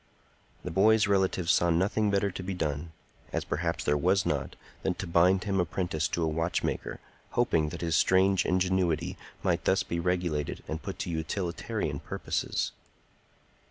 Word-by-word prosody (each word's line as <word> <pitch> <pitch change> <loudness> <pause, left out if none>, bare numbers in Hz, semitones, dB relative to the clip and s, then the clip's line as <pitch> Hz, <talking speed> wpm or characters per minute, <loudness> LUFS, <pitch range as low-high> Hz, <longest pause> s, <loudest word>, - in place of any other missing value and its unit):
The - - -4
boy's 110 +5 +5
relatives 95 -3 +2
saw 85 - +3
nothing 100 +5 +2
better 100 0 +1
to 90 - -6
be 95 +1 -4
done—as 80 0 -5
perhaps 85 +2 -2
there 75 - +2
was 95 +6 +2
not—than - - -3
to - - -5
bind 90 +3 +4
him 100 -3 0
apprentice 85 -3 0
to 85 - -1
a - - +2
watchmaker, 80 +2 -2 0.4
hoping 85 -11 +2
that 85 +1 -7
his 85 -2 0
strange 95 +1 +4
ingenuity 90 -3 +1 0.3
might - - 0
thus - - +3
be 85 - -3
regulated 85 -4 -1
and 80 +1 -4
put 95 - -6
to 90 - -4
utilitarian 85 +2 -2
purposes. - - -2
90 Hz, 150 wpm, -29 LUFS, 80-95 Hz, 0.4 s, boy's